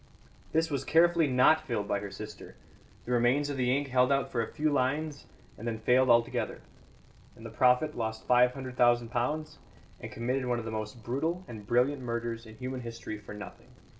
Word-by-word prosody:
This 160 0 +1
was 140 - -1
carefully 170 0 +4
not 130 +4 +4
filled 105 -5 -3
by 100 - 0
her 100 0 -6
sister; 105 +1 -9 0.5
the 125 - -5
remains 125 +4 +2
of 140 - -4
the 125 -1 +1
ink 140 -1 -3
held 125 +1 +3
out 140 -1 +1
for 120 - 0
a 115 - -4
few 155 0 0
lines 145 +2 -1 0.3
and 115 - -6
then 115 -1 -2
failed 125 +4 +3
altogether. 120 0 +2 0.7
And - - -13
the - - -7
prophet 125 +4 +3
lost 110 -1 -4
five 125 0 +4
hundred 130 -2 -7
thousand 120 -1 +3
pounds 145 +6 -2 0.4
and - - -8
committed 125 +2 -2
one 120 -1 +1
of 115 - -5
the 110 - -4
most 110 +1 -5
brutal 160 - -2
and 105 -3 -9
brilliant 125 +4 +2
murders 115 -1 -4
in 110 - -12
human 130 0 -5
history 115 -2 -7
for 105 0 -10
nothing." 105 -1 -10
125 Hz, 195 wpm, -30 LUFS, 115-140 Hz, 0.7 s, carefully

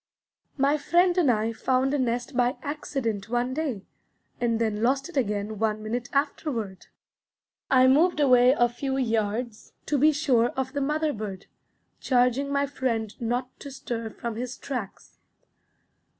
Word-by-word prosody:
My 285 +2 +2
friend 350 +4 +3
and 345 -7 +3
I 225 -1 +1
found 260 +4 +1
a 290 - +1
nest 245 +1 -2
by 245 +1 +1
accident 265 -8 -3
one 245 +2 0
day, 265 -10 -3 0.5
and 235 -2 +1
then 215 -2 -1
lost 270 +6 +1
it 350 - -12
again 210 -4 -1
one 215 -1 0
minute 240 +3 -3
afterward. 270 - -2 0.8
I 255 -1 +5
moved 305 +6 +4
away 255 -3 +6
a 240 - +4
few 265 +3 -3
yards 225 -2 -2
to 290 -2 0
be 305 +3 +6
sure 275 -6 +2
of 265 0 -2
the 285 - -1
mother 300 +2 0
bird, 200 -3 -6 0.5
charging 250 +2 +1
my 280 0 +1
friend 235 -6 -2
not 245 +2 -2
to 280 - -8
stir 235 -4 -5
from 230 0 -6
his 250 +1 -5
tracks. 245 -8 -7
250 Hz, 150 wpm, -26 LUFS, 225-280 Hz, 0.8 s, away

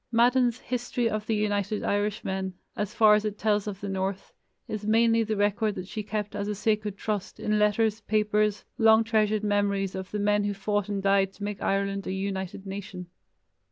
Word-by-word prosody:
Madden's 245 +1 +3
History 245 -1 -1
of 215 -1 -3
the 225 - +1
United 205 0 -1
Irishmen, 195 -2 -1 0.2
as 210 -1 -2
far 215 -1 +6
as 210 0 +3
it 210 -1 -3
tells 210 -1 +1
of 200 -2 -5
the 200 - -4
north, 195 0 -3 0.3
is 215 -1 -4
mainly 230 +1 +4
the 220 -1 -1
record 205 +1 +1
that 185 - -6
she 215 - -4
kept 210 0 -4
as 200 0 -2
a 210 - -2
sacred 210 -1 -1
trust 205 -1 -3
in 215 0 +1
letters, 210 +1 +2
papers, 210 0 +1
long 220 0 +6
treasured 215 -1 +1
memories 200 -2 +1
of 190 -1 -5
the 210 - -3
men 205 0 +2
who 205 0 -1
fought 205 +1 -1
and 200 -1 -2
died 195 -1 +3
to 205 - -10
make 205 -1 -4
Ireland 195 0 -1
a 185 - -2
united 190 0 -4
nation. 190 -2 -7
210 Hz, 190 wpm, -27 LUFS, 195-215 Hz, 0.3 s, far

